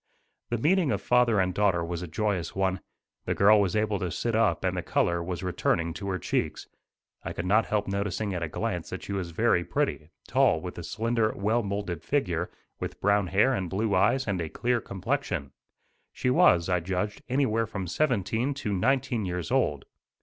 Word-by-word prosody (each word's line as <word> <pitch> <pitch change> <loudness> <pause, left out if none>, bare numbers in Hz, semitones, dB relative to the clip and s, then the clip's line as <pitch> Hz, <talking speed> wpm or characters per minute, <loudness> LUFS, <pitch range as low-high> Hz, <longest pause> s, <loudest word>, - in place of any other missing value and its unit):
The 120 - 0
meeting 165 - +2
of 100 - 0
father 120 -1 +3
and 90 -1 +1
daughter 95 -4 +2
was 85 0 -4
a 90 - -5
joyous 95 0 -2
one. 95 -1 0 0.5
The - - -1
girl 105 +1 +6
was 95 -2 0
able 105 -2 +1
to 90 - -2
sit 115 +7 -2
up 100 -7 +2
and - - 0
the - - -1
color 85 0 +1
was 90 +1 -4
returning 85 -2 0
to 100 +3 -5
her 95 - -1
cheeks. - - -2 0.6
I - - -4
could 85 - -4
not 105 +4 +3
help 105 -1 0
noticing 100 +1 -2
at 90 - -3
a 85 - -2
glance - - -3
that - - -6
she 100 - -5
was 95 -3 -3
very 90 0 +2
pretty, 75 -2 -2 0.2
tall - - +3
with - - -7
a - - -6
slender 115 +1 0
well 110 +4 +1
moulded 100 -5 -3
figure, 90 - -1 0.3
with - - -5
brown 100 -1 +2
hair 105 +9 +3
and 95 -7 -2
blue 105 +3 0
eyes 120 +8 +3
and 95 -4 -1
a 80 - -3
clear 120 +4 0
complexion. 95 - -3 0.6
She 125 - 0
was, 85 -8 +5
I 90 -1 +2
judged, 95 +4 -3
anywhere 120 -4 +1
from 100 -3 -4
seventeen 120 - 0
to 110 -7 -3
nineteen 120 +2 +1
years 90 -3 -3
old. 75 -2 +1
100 Hz, 195 wpm, -27 LUFS, 90-115 Hz, 0.6 s, girl